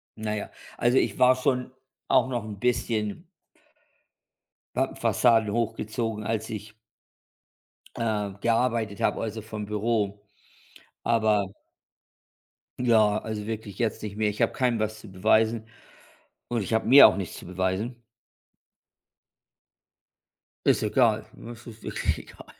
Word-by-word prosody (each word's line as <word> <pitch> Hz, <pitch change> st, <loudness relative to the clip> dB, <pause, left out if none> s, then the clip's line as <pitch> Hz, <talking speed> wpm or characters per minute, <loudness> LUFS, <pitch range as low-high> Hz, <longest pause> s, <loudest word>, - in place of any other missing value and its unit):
naja 105 Hz, -1 st, -4 dB, 0.3 s
also, 120 Hz, +2 st, +3 dB
ich -, -, -1 dB
war 125 Hz, 0 st, +6 dB
schon 130 Hz, -1 st, -1 dB, 0.4 s
auch -, -, +3 dB
noch 120 Hz, -4 st, -2 dB
‘n 105 Hz, -2 st, -8 dB
bisschen 110 Hz, -3 st, -1 dB, 1.5 s
habe -, -, 0 dB
Fassaden 115 Hz, -4 st, +3 dB
hochgezogen, 115 Hz, -1 st, -2 dB
als 110 Hz, 0 st, -2 dB
ich 105 Hz, -1 st, -7 dB, 1.2 s
äh, 105 Hz, -3 st, -1 dB
gearbeitet 115 Hz, -3 st, 0 dB
habe, -, -, +1 dB
also 110 Hz, 0 st, -4 dB
vom 110 Hz, -1 st, -6 dB
Büro, 105 Hz, -1 st, -1 dB, 0.8 s
aber 110 Hz, -3 st, +2 dB, 1.3 s
Ja, 110 Hz, -4 st, +4 dB
also 110 Hz, -1 st, -5 dB
wirklich 110 Hz, -3 st, -6 dB
jetzt 115 Hz, -2 st, -1 dB
nicht 105 Hz, -1 st, -6 dB
mehr. 110 Hz, 0 st, +1 dB
Ich 105 Hz, -, -8 dB
habe -, -, +2 dB
keinem 125 Hz, -3 st, +1 dB
was 110 Hz, 0 st, -2 dB
zu 110 Hz, -, -12 dB
beweisen. 110 Hz, +3 st, +2 dB, 0.8 s
Und 120 Hz, -3 st, -1 dB
ich 100 Hz, -, -5 dB
habe 110 Hz, -, +1 dB
mir 140 Hz, +3 st, +11 dB
auch -, -, -1 dB
nichts 95 Hz, -4 st, -5 dB
zu -, -, -11 dB
beweisen. 95 Hz, +7 st, -2 dB, 2.6 s
Ist -, -, +3 dB
egal, 110 Hz, -1 st, +2 dB
das 120 Hz, 0 st, -11 dB
ist 115 Hz, -2 st, -11 dB
wirklich -, -, -2 dB
egal. -, -, -13 dB
110 Hz, 125 wpm, -26 LUFS, 105-115 Hz, 2.6 s, mir